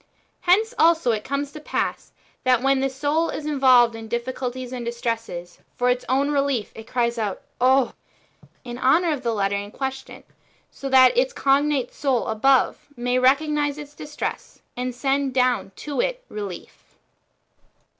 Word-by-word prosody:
"^ - - -36 0.4
Hence 430 +6 +3
also 325 -6 +4
it 215 -2 -2
comes 280 +1 -3
to 305 - -9
pass, 300 - -3 0.3
that 255 -1 +3
when 270 0 +3
the 270 0 +1
soul 290 +5 0
is 300 - -5
involved 260 -5 +5
in 225 -1 -9
diffi 235 +2 -2
culties 255 -1 -5
and 250 -2 -5
distresses, 230 -7 -4 0.2
for 250 0 +2
its 250 0 -2
own 275 +3 +2
relief 275 -6 0
it 225 0 -11
calls 235 -1 0
out, 205 -3 -3
" - - -21
Oh" 265 -2 +2 0.5
(/2), - - -20 0.2
in 240 -2 -7
honour 320 +7 +3
of 280 - -5
the 235 -3 -1
letter 200 -2 0
in 205 0 -5
question,* 265 +3 -6 0.5
so 275 - -6
that 260 -1 +6
its - - +2
cognate 275 - +1
soul 265 -5 0
above 255 +4 +2
may 245 +1 0
recognise 290 +2 +2
[its 295 -1 -9
distress], 295 0 -6
and 250 0 -3
send 270 +1 0
down 250 -5 +1
to 285 -4 -3
it - - -2
relief. 200 -4 -9
260 Hz, 170 wpm, -23 LUFS, 240-285 Hz, 0.5 s, that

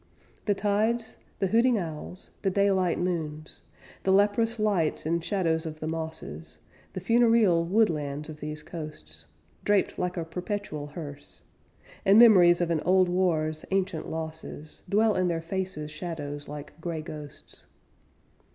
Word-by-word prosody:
The 205 - +2
tides, 220 +3 0 0.2
the 195 - 0
hooting 235 +4 +3
owls, 170 0 -5
the 195 - +1
daylight 190 -2 +2
moons, 155 -4 -3 0.4
The 190 - +1
leprous 210 +4 +3
lights 200 -10 +1
and 165 +1 0
shadows 165 -4 0
of 155 -1 -7
the 155 - -4
mosses, 80 - -6 0.4
The - - -4
funereal 225 -4 +4
woodlands 155 -7 +1
of 155 -1 -9
these 150 +1 -5
coasts, 80 - -9 0.4
Draped 205 -1 +1
like 180 0 -2
a 165 - -2
perpetual 175 -3 -4
hearse, 145 -2 -9 0.6
And 195 +2 +6
memories 180 -7 +7
of 170 -1 0
an 160 -2 +1
old 185 0 +4
war's 160 -4 0
ancient 190 -4 -1
losses, 160 -1 -7
Dwell 215 +1 +3
in 185 -2 +1
their 170 -2 0
faces' 165 -3 -4
shadows 150 -3 -6
like 150 +2 -9
gray 160 -2 -3
ghosts. 150 -2 -10
170 Hz, 140 wpm, -27 LUFS, 155-195 Hz, 0.6 s, memories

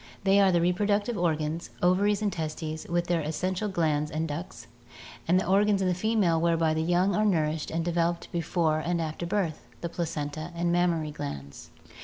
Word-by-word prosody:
They 195 0 +4
are 195 -1 +5
the 175 -1 +3
reproductive 205 +5 +1
organs, 160 -2 -1
ovaries 200 +3 +3
and 205 -3 0
testes, 155 -1 -4
with 175 0 0
their 175 -1 +1
essential 185 +6 -2
glands 155 -5 0
and 160 +2 -2
ducts, 160 +4 -6 0.6
and 180 +2 +4
the - - -2
organs 200 +2 +3
in 190 - +1
the 180 - +2
female 185 -4 +1
whereby 165 -1 +2
the 160 - 0
young 175 +4 +2
are 210 - +2
nourished 160 -6 +1
and 165 0 -2
devel 170 -1 +2
oped 170 - -13
before 165 -2 0
and 170 +2 -1
after 160 +1 -3
birth, 175 -5 -2
the 170 - -3
placenta 155 -1 -4
and 170 0 0
mammary 170 -3 +1
glands. 70 - -7
170 Hz, 185 wpm, -28 LUFS, 160-185 Hz, 0.6 s, are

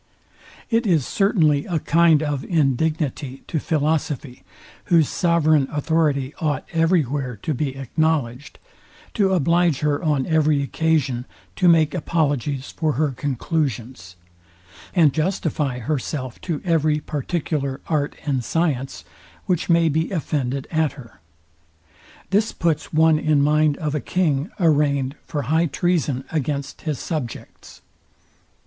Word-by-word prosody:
It 230 0 +2
is 160 -8 +2
certainly 160 -8 +2
a 175 - 0
kind 160 0 +3
of 145 -3 -2
indignity 145 -2 -1
to 160 - -2
philosophy, 150 -4 -1 0.4
whose 165 -5 +4
sovereign 155 -5 +2
authority 150 -2 0
ought 145 -3 -1
every 165 0 +3
where 130 -2 -3
to 155 - -1
be 135 0 -2
acknowledged, 140 0 -1 0.6
to 200 -4 +2
oblige 170 -1 +2
her 150 +1 0
on 145 -5 +1
every 155 -3 +2
occasion 140 -5 0 0.3
to 180 - +2
make 160 -3 +4
apologies 145 -5 -1
for 155 -2 -1
her 150 +1 0
conclusions, 130 - -3 0.8
and 160 -6 +5
justify 155 -5 -1
herself 130 0 -4
to 165 -5 -4
every 155 -3 +2
particular 145 -2 -3
art 150 -3 -1
and 135 -5 0
science, 135 -2 -1 0.4
which 180 -2 -1
may 170 -1 +4
be 160 +2 0
offended 140 -6 -2
at 160 -3 +1
her. 130 -6 -14 1.1
This 210 +3 +2
puts 160 -3 -1
one 160 0 +4
in 150 -2 +2
mind 150 0 +3
of 150 -2 -3
a 150 - -1
king 155 - 0
arrainged 145 -5 +2
for 145 -3 -3
high 160 +6 +2
treason 155 -5 0
against 140 -2 -3
his 150 - -1
subjects. 150 -7 -6
150 Hz, 125 wpm, -22 LUFS, 140-165 Hz, 1.1 s, and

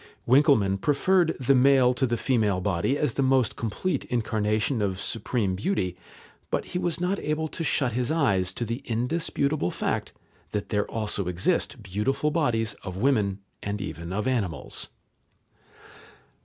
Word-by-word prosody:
Winckelmann 125 -8 +4
preferred 170 +4 +2
the 135 +1 +3
male 130 -1 +5
to 130 +1 0
the 120 0 0
female 110 -8 +1
body 95 +8 0
as 145 -5 0
the - - -1
most 130 -3 +2
complete 115 - -2
incarnation 110 0 0
of 95 -2 -1
supreme 115 -3 -1
beauty, 95 - -1 0.5
but - - -1
he 180 - -3
was 175 -2 -1
not 180 +3 0
able 155 +1 -1
to 165 - -5
shut 140 -5 +1
his 125 +2 -1
eyes 100 - +2
to 120 - -3
the 115 +2 -4
indisputable 140 - 0
fact - - -2 0.4
that 105 -1 -2
there 105 -1 0
also 105 -4 -1
exist 90 0 0
beautiful 105 +10 0
bodies 120 -9 +1
of 95 -2 -6
women 105 -5 +1 0.2
and 100 +1 -3
even 85 -3 -6
of 105 +2 -2
animals. 100 - -1
115 Hz, 150 wpm, -26 LUFS, 100-140 Hz, 0.5 s, male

